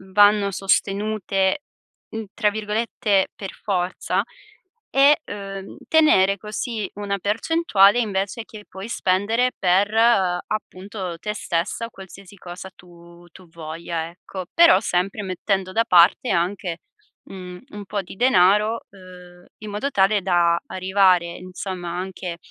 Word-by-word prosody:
m 190 0 -16
vanno 205 0 +5
sostenute, 195 +3 0 0.5
n 225 - -4
tra 215 -2 +1
virgolette 210 -1 0
"per 195 -2 -7
forza", 180 -3 -2 0.7
e, 280 +3 +5
uhm, 195 -1 -8
tenere 200 -12 +4
così 215 +1 -4
una 200 -1 -3
percentuale, 210 - +3
invece 200 0 -2
che, 215 -2 -12
puoi 190 +4 -9
spendere 225 +5 +1
per, 195 +3 +2
appunto, 195 -3 0
te 210 +3 -3
stessa, 175 +4 -2
o - - -9
qualsiasi 195 0 -13
cosa 180 +1 -9
tu 170 -1 -17
tu 185 +1 -16
voglia, 165 0 -5
ecco. 185 +2 -9
Però, 335 - +6
sempre 195 0 -1
mettendo 190 0 -2
da 230 - +3
parte, 180 +7 +5
anche, 175 -1 -1 0.5
mhmm, 180 -1 -9
un 205 -6 -9
po' 205 +1 -3
di 190 - -12
denaro, 210 0 +3
uhm, 180 -2 -15
in 215 - -8
modo 210 +8 -3
tale 200 0 +3
da, 170 -2 +3
arrivare, 185 -1 +3
insomma, 185 -1 -6
anche 180 -1 -5
195 Hz, 130 wpm, -22 LUFS, 180-210 Hz, 0.7 s, Però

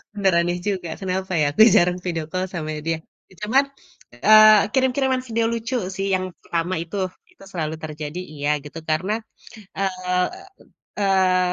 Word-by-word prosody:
bener 195 -3 +2
aneh 175 +1 0
juga 185 -4 -2
kenapa 190 0 -3
ya - - +3
aku 190 - +2
jarang 180 +1 +4
video 165 -3 -2
call 185 0 -1
sama 155 -2 -4 0.2
dia, 165 -1 +1 0.3
ya - - -19
cuman, 270 +6 +3 0.6
eee, 215 -1 +9
kirim-kiriman 260 0 +2
video 230 0 0
lucu 230 +2 -3 0.2
sih 195 0 -2
yang 185 0 -2
pertama 170 +2 -2
itu, 175 +4 -7 0.3
itu - - -18
selalu 160 -3 -3
terjadi 155 0 -6 0.2
iya 145 0 -2
gitu 150 +3 -8
karena, 185 +7 0 0.7
eee, 185 -1 0 0.8
eee, 185 -2 +3
185 Hz, 150 wpm, -22 LUFS, 170-210 Hz, 0.8 s, eee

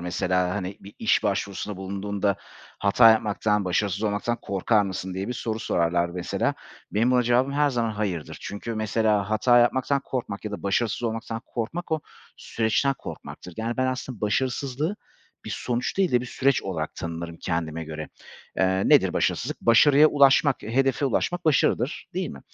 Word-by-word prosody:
mesela, 90 +1 0
hani, 95 -1 -4
bir 100 - -13
iş - - +2
başvurusunda 100 0 -2
bulunduğunda 100 +1 -2 0.4
hata 110 +3 +6
yapmaktan, 105 -1 +1
başarısız 100 +2 0
olmaktan 110 +3 -1
korkar 100 +2 +2
mısın 95 -1 -4
diye 95 +3 -3
bir - - -1
soru 115 -2 -3
sorarlar 85 -3 +1
mesela. 90 0 -2 0.4
Benim 115 +4 +2
buna 125 -1 +4
cevabım 125 +3 +2
her 145 0 +2
zaman 115 -3 0
hayırdır 100 -7 -3
çünkü 110 +3 -5
mesela 110 -2 +1
hata 120 +3 +4
yapmaktan 130 +3 +2
korkmak 115 -6 -4
ya 105 - -3
da 105 - -6
başarısız 105 +4 0
olmaktan 115 0 -3
korkmak 160 +9 -4
o 155 - +1 0.4
süreçten 115 +5 0
korkmaktır. 90 -2 -9
Yani, 115 +1 -3
ben 130 - +1
aslında 130 -3 -4
başarısızlığı 130 - -1 0.5
bir - - -6
sonuç 125 +6 -2
değil 185 -8 +2
de 120 - +4
bir 125 - -6
süreç 135 +2 +1
olarak 80 -5 -4
tanırım 85 0 -6
kendime 80 -1 -3
göre. 80 0 -6 0.5
Eee, 95 0 +2
nedir - - +5
başarısızlık? - - -1
Başarıya 140 +6 +6
ulaşmak, 140 -1 +4
hedefe 135 +5 +1
ulaşmak 175 +6 0
başarıdır, 140 -3 +1
değil 185 -2 -2
mi? - - -9
110 Hz, 160 wpm, -25 LUFS, 95-125 Hz, 0.5 s, hata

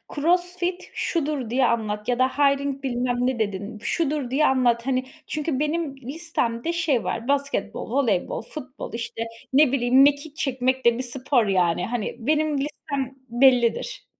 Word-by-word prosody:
"CrossFit 355 +3 0
şudur." 295 -7 -1
diye 255 +1 +2
anlat 215 -2 -1
ya 245 0 +1
da 255 - +5
hiring 280 0 +1
bilmem 245 -1 -1
ne 250 -1 0
dedin. 205 +1 -3
Şudur 295 -3 -1
diye 300 +3 +3
anlat, 245 -2 +2
hani, 255 -1 +1 0.2
çünkü 300 -3 -2
benim 300 -2 -1
listemde 275 0 -2
şey 310 -8 +1
var; 230 +2 -3
basketbol, 280 -4 -1
voleybol, 245 -10 0
futbol 255 0 -8
işte 230 0 -4 0.3
ne 285 -1 +5
bileyim, 260 0 +4
mekik 285 +1 +3
çekmek 260 -1 -1
de 235 0 +5
bir 260 - -2
spor 250 -1 +1
yani, 180 -3 +1
hani, 235 -2 -3
benim 300 +3 +1
listem 280 -2 -4
bellidir. 250 - +2
265 Hz, 150 wpm, -24 LUFS, 240-295 Hz, 0.3 s, da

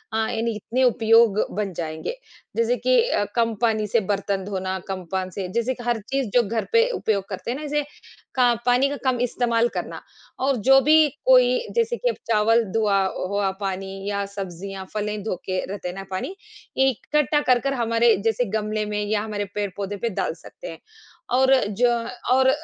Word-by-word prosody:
यानी 225 0 -1
इतने 245 +5 -1
उपयोग 225 -3 +4 0.2
बन 205 -3 -2
जाएँगे। 160 - -4 0.4
जैसे 235 +2 +2
कि 250 +2 +3
अ, 205 - +1
कम 230 -1 +2
पानी 220 -2 +1
से 230 - +2
बर्तन 200 -1 -1
धोना, 190 -1 -3
कम 185 -2 -5
पान 185 -1 -1
से 190 0 -4
जैसे 235 +2 0
कि 240 - -10
हर 240 -2 0
चीज़ 270 -5 -1
जो 245 - +6
घर 225 +1 -1
पे 460 +2 +5
उपयोग 200 -3 -1
करते 200 +4 -4
हैं 260 - -3
ना, 305 - -7
जैसे 295 0 0 0.5
का 245 -2 +4
पानी 250 +3 +4
का 285 - -4
कम 250 -2 +2
इस्तेमाल 235 -1 +1
करना - - -4 0.4
और 275 -1 +2
जो 270 0 +8
भी 305 +2 +5 0.2
कोई - - +5 0.2
जैसे 470 +1 +1
कि - - 0
अब - - -2 0.2
चावल 225 +2 +4
धुआ 205 -3 +2 0.3
हुआ 200 -1 0
पानी 195 0 -3 0.2
या 200 0 -1
सब्जियाँ, 195 -1 -7
फलें 210 0 -2
धो 215 - -2
के 185 -1 -1
रहते 195 -2 -6
हैं 180 - -7
ना 195 - -6
पानी, 260 - -4 0.4
इकट्ठा 295 +3 +2
कर-कर 255 +1 +2
हमारे 230 -1 +3
जैसे 225 +2 +2
गमले 215 0 -2
में 210 0 -2
या 210 0 0
हमारे 210 -1 -3
पेड़-पौधे 200 0 -3
पे 235 +3 -1
डाल 190 - -2
सकते - - -12
हैं। - - -11 0.5
और 265 +1 +5
जो 235 +4 +2 0.4
और 260 0 +5
225 Hz, 185 wpm, -23 LUFS, 200-255 Hz, 0.5 s, जो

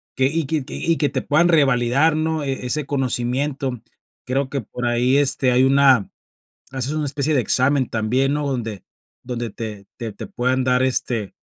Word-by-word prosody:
que 130 - +2
y 160 +2 -1
que 155 0 -1
y 165 -1 -1
que 145 - +1
te 130 -2 -2
puedan 155 +4 +2
revalidar, 140 -1 +3
¿no? 160 0 -1
E 135 -2 -3
ese 140 +3 -1
conocimiento. 130 -1 -1 0.4
Creo 130 +1 -1
que 140 -2 -3
por 125 +3 -6
ahí, 125 +3 +2
este, 135 -2 +2
hay 125 +1 +4
una 135 -5 +4 0.6
haces 130 +1 -2
una 155 -1 -2
especie 145 +2 0
de 130 - +3
examen 130 +3 +2
también, 125 +6 0
¿no? 150 -1 -2
Donde 115 -7 -4 0.4
donde 120 -2 -4
te 105 -2 -7
te 115 -3 -5
te - - -8
puedan 130 +1 -1
dar, 125 0 +2
este, 120 -5 -1
130 Hz, 180 wpm, -21 LUFS, 120-145 Hz, 0.6 s, hay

